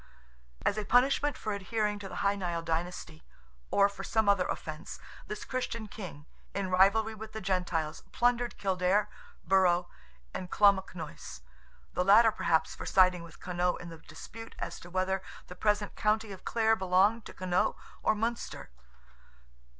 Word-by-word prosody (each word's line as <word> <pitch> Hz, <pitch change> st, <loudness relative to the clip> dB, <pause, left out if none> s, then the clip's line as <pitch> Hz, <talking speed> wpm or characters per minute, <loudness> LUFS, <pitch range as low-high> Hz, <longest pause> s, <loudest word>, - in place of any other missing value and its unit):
As 210 Hz, -, +2 dB
a -, -, -2 dB
punishment 270 Hz, +5 st, +3 dB
for 215 Hz, -, -3 dB
adhering 210 Hz, +1 st, -1 dB
to 195 Hz, -1 st, -7 dB
the -, -, -8 dB
Hy 200 Hz, -, +4 dB
Nial 175 Hz, -4 st, -3 dB
dynasty, 165 Hz, -1 st, -3 dB, 0.5 s
or 200 Hz, 0 st, +5 dB
for 200 Hz, -, -8 dB
some 220 Hz, -1 st, +1 dB
other 200 Hz, -3 st, +4 dB
offence, 155 Hz, +3 st, -5 dB, 0.3 s
this 210 Hz, -, -6 dB
Christian 230 Hz, -4 st, -3 dB
king, 180 Hz, -8 st, -9 dB, 0.3 s
in 195 Hz, -2 st, -2 dB
rivalry 200 Hz, +4 st, +4 dB
with 220 Hz, 0 st, -9 dB
"the 220 Hz, -, -4 dB
Gentiles," 180 Hz, -5 st, -1 dB
plundered 245 Hz, 0 st, +1 dB
Kildare, 195 Hz, +2 st, +1 dB, 0.3 s
Burrow, 180 Hz, -2 st, +3 dB, 0.4 s
and 180 Hz, -, -5 dB
Clonmacnoise—the 170 Hz, -, -1 dB
latter 215 Hz, +4 st, +7 dB
perhaps 170 Hz, -5 st, +1 dB
for -, -, -8 dB
siding 185 Hz, -2 st, +4 dB
with 170 Hz, -2 st, -12 dB
Connaught 180 Hz, 0 st, -1 dB
in 175 Hz, -, -8 dB
the 165 Hz, -1 st, -10 dB
dispute 220 Hz, +9 st, -11 dB
as -, -, -5 dB
to 175 Hz, -, -12 dB
whether 185 Hz, +1 st, 0 dB, 0.2 s
the 180 Hz, -, -10 dB
present 210 Hz, +1 st, 0 dB
county 215 Hz, 0 st, +1 dB
of 190 Hz, -, -10 dB
Clare 225 Hz, -1 st, +3 dB
belonged 190 Hz, +4 st, +3 dB
to -, -, -9 dB
Connaught 185 Hz, -1 st, +1 dB, 0.3 s
or -, -, +2 dB
Munster. 230 Hz, -, -3 dB
190 Hz, 150 wpm, -30 LUFS, 180-215 Hz, 0.5 s, latter